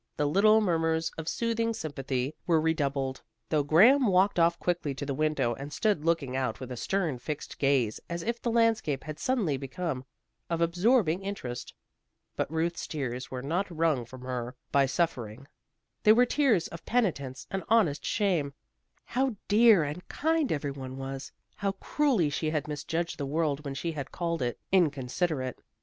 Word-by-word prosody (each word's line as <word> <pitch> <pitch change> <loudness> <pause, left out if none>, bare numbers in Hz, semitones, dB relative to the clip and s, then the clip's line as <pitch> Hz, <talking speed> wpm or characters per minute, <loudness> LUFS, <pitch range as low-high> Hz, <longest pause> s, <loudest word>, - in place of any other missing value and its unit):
The 150 - +1
little 210 +8 +5
murmurs 165 -4 +1
of 160 0 -4
soothing 230 -1 0
sympathy 135 -3 -3
were 165 -2 +4
redoubled, 140 -4 -1 0.3
though 155 - +2
Graham 220 - +6
walked 190 0 +3
off 170 +1 +4
quickly 170 -7 -1
to 140 - -5
the 140 - -2
window 150 -4 +1
and 140 +5 -7
stood 200 -1 +1
looking 160 -6 0
out 130 -4 -1
with 130 -1 -7
a - - -3
stern, 165 -1 -1
fixed 150 +4 -6
gaze, 135 -6 +2
as 170 0 -3
if 235 +1 -2
the 240 - -1
landscape 225 - +2
had 155 -1 -7
suddenly 210 - 0
become 135 +1 -4 0.5
of 170 -1 -1
absorbing 175 +1 +2
interest. 130 -12 -5 0.6
But - - -2
Ruth's 165 +1 -1
tears 130 -4 -4
were 125 -1 -5
not 175 +8 -1
wrung 160 -6 +1
from 125 +2 -12
her 125 -1 -4 0.2
by 140 -1 +4
suffering. 130 -5 -2 0.5
They 215 - +7
were 245 +2 +5
tears 245 - +2
of 170 - -9
penitence 145 - -1
and 195 -1 -2
honest 205 -11 +3
shame. 170 -9 0 0.5
How 260 -1 0
dear 215 -4 +6
and 150 +5 -5
kind 320 -1 0
every 145 -2 -1
one 130 -1 -7
was! 135 0 -6 0.3
How 200 -1 -1
cruelly 210 - +1
she 155 +2 -1
had 155 -2 -1
misjudged 160 +3 -3
the 140 - -2
world 150 -1 0
when 140 -2 -5
she 165 +5 -2
had 140 -4 -6
called 170 -3 -2
it 120 -1 -1
inconsiderate. 145 -4 0
160 Hz, 170 wpm, -29 LUFS, 135-195 Hz, 0.6 s, They